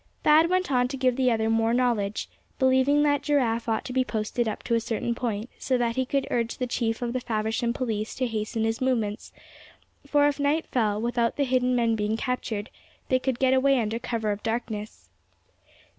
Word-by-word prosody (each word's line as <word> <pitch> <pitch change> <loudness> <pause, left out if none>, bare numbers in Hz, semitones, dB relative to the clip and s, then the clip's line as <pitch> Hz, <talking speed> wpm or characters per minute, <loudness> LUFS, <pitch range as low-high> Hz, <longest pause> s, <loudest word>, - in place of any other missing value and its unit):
Thad 315 +2 +5
went 370 -3 0
on 250 -1 +3
to 270 +1 -5
give 255 -1 +2
the 260 -1 +2
other 220 -2 +1
more 225 +1 +2
knowledge, 230 -5 0 0.3
believing 260 +2 +3
that 285 -2 +2
Giraffe 250 -6 0
ought 220 - -1
to 255 - -5
be 260 0 +2
posted 225 0 -2
up 215 - -4
to 235 - -2
a 230 - +4
certain 230 +1 -2
point, 225 -2 -3
so 255 - 0
that 235 -1 0
he 260 -1 0
could 275 0 0
urge 235 -1 -1
the 250 - -1
Chief 230 -1 -2
of 240 0 -2
the 255 - 0
Faversham 225 0 -1
police 225 -3 -3
to 260 - -1
hasten 220 -1 -2
his 225 +2 -1
movements; 225 -5 -1 0.8
for 290 0 +4
if 290 0 -1
night 290 +3 +1
fell, 215 -4 0
without 235 0 0
the 285 - +1
hidden 255 -1 +1
men 230 -2 +2
being 215 +1 -1
captured, 230 -4 -3 0.4
they 255 - +3
could 255 -1 -1
get 260 0 +3
away 265 0 +3
under 225 0 -1
cover 225 -3 -2
of 205 0 -4
darkness. 220 -2 -4
240 Hz, 205 wpm, -26 LUFS, 225-260 Hz, 0.8 s, Thad